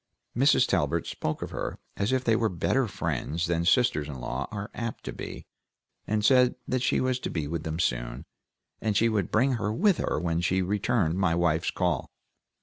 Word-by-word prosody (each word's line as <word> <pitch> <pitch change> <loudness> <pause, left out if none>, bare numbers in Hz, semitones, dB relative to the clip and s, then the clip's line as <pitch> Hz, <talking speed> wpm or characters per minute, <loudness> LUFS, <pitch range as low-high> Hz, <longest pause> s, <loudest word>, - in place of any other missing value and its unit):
Mrs. 135 +5 +5
Talbert - - +1
spoke 80 - -3
of - - -6
her - - -4 0.2
as 100 +4 0
if 130 -1 +1
they 115 -3 +3
were 110 -1 +1
better 115 +8 +1
friends 85 - -2
than 85 0 0
sisters 90 - +3
in 75 - -6
law 65 +2 -4
are 100 -1 -6
apt 115 -1 -5
to - - -5
be, - - -7 0.6
and 105 0 0
said 125 -1 +5
that 130 -1 0
she - - +2
was 130 -1 0
to - - -4
be 80 -4 -2
with 80 +1 -3
them 80 0 -3
soon, - - -1 0.6
and 105 -2 +1
she 115 - +4
would 105 -5 0
bring 130 +5 +3
her 105 - 0
with 190 - +2
her - - 0
when 85 0 0
she 95 +2 +1
returned 100 -2 0
my 90 -4 +2
wife's 85 -1 +1
call. 90 -2 -1
95 Hz, 200 wpm, -27 LUFS, 80-115 Hz, 0.6 s, Mrs